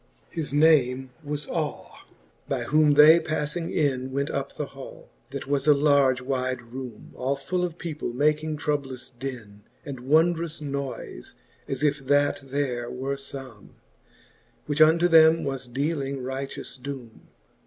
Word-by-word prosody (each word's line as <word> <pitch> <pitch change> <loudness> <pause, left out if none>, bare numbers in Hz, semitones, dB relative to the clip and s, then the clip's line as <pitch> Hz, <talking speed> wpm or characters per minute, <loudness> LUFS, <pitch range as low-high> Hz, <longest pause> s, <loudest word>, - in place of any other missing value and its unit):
XXIII. 165 - -3
His 145 - -2
name 135 -4 +4
was 145 0 -3
y^we; 155 -3 -3 0.6
by - - -1
whom 150 0 +4
they 155 +3 +9
pafling 155 +1 -2
in 130 -4 0
Went 140 +1 -1
up - - -3
the - - -3
hall, - - -11 0.2
that - - -6
was 140 0 -1
a 150 - +7
large 140 -3 +3
wyde 130 -2 -3
roome, 130 -4 -8
All 135 +2 -1
full 180 +6 -2
of 175 -2 -3
people 155 -7 -4
making 150 +4 +1
troublous 140 -4 -3
din, 120 -5 -8 0.2
And 140 -3 -6
wondrous 160 +4 +2
noyfe, 140 - -5 0.3
as 135 +2 -2
if 145 -1 +2
that 145 +1 +3
there 130 -3 -2
were 135 +2 -3
fome, 135 -5 -9 0.9
Which 150 +1 0
unto 165 +3 +6
them 160 -1 +6
was 135 -2 -3
dealing 140 0 -2
righteous 135 0 -5
doome. 130 -4 -8
140 Hz, 145 wpm, -26 LUFS, 130-150 Hz, 0.9 s, they